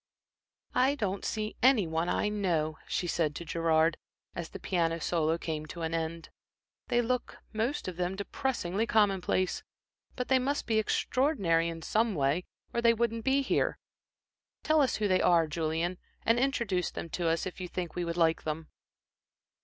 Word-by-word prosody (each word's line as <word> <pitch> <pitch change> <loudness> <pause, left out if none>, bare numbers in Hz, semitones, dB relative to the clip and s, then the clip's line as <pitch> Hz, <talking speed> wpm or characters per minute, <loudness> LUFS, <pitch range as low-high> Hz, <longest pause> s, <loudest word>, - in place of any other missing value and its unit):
"I 265 +3 +3
don't 200 -7 -2
see 215 -1 -2
any 250 -5 +5
one 165 +2 -1
I - - +1
know," 170 -7 0
she 180 - -1
said 160 -3 0
to 170 - -6
Gerard, 165 -1 +2 0.4
as 170 -1 -5
the - - -7
piano 165 -3 0
solo 165 0 +1
came 155 -2 -4
to 170 +1 -6
an 160 0 -2
end. 165 0 -3 0.6
"They 240 -1 +2
look, 250 +1 -2 0.2
most 225 +5 -1
of 180 -2 -5
them, 180 +1 -1
depressingly 205 -1 -2
commonplace. 195 -4 +2 0.5
But 250 - -3
they 260 -1 +4
must 280 +3 -1
be 220 -1 +2
extraordinary 205 - +1
in 165 -1 -7
some 220 +2 +1
way, 145 +5 +1 0.3
or 235 - 0
they 230 0 +5
wouldn't 230 0 -1
be 270 +1 +3
here. - - +1 0.9
Tell 310 -1 +4
us 270 - +2
who 210 - 0
they 185 -1 +3
are, 170 -2 +5
Julian, 165 +3 -2 0.3
and 230 +1 +4
introduce 235 -9 0
them - - -6
to 170 +1 -2
us 165 0 +1
if 185 0 -6
you 180 - -3
think 175 -2 -4
we 175 - -2
would 170 0 -3
like 165 -1 +3
them." 155 +1 -4
180 Hz, 175 wpm, -30 LUFS, 165-230 Hz, 0.9 s, any